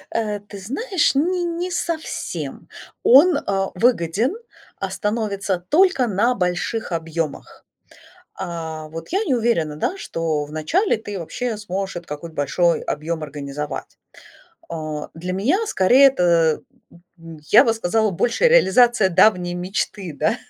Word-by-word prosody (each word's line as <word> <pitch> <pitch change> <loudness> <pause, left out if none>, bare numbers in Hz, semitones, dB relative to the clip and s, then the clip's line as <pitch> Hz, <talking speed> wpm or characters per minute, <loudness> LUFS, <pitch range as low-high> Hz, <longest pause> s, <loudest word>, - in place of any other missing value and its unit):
Э, 210 -2 -1
ты 205 0 -11
знаешь, 295 - 0
не 350 +5 +1
не 345 +1 -3
совсем. 335 -2 -4 0.3
Он, 290 +5 +7
а, 195 -1 -1
выгоден, 225 - +1 0.4
а, - - -3
становится 205 -3 -2
только 300 - +3
на 220 +4 +2
больших 180 +3 -2
объемах. 165 -2 -4 0.7
А, 160 -2 -6
вот 165 +1 -8
я 395 +5 0
не 275 - +1
уверена, 220 -11 0
да 345 - -2
что 160 - -2
в 145 - -12
начале 280 - +1
ты 205 -3 -7
вообще 225 +7 -4
сможешь 195 -2 -4
этот 175 -1 -8
какой-то 155 +3 -7
большой 165 +4 +1
объем 160 +2 -3
организовать. 145 0 -6 0.7
Э, 155 -2 -5
для 180 +3 -4
меня 225 - +1
скорее 255 - +5
это, 170 - +2 0.6
м, 165 -1 -11
я - - +8
бы 230 - +3
сказала, 220 0 0
больше 240 - +2
реализация 240 - +4
давней 180 -1 +3
мечты, 185 -1 -3
да, 160 +10 +1
195 Hz, 135 wpm, -21 LUFS, 165-245 Hz, 0.7 s, я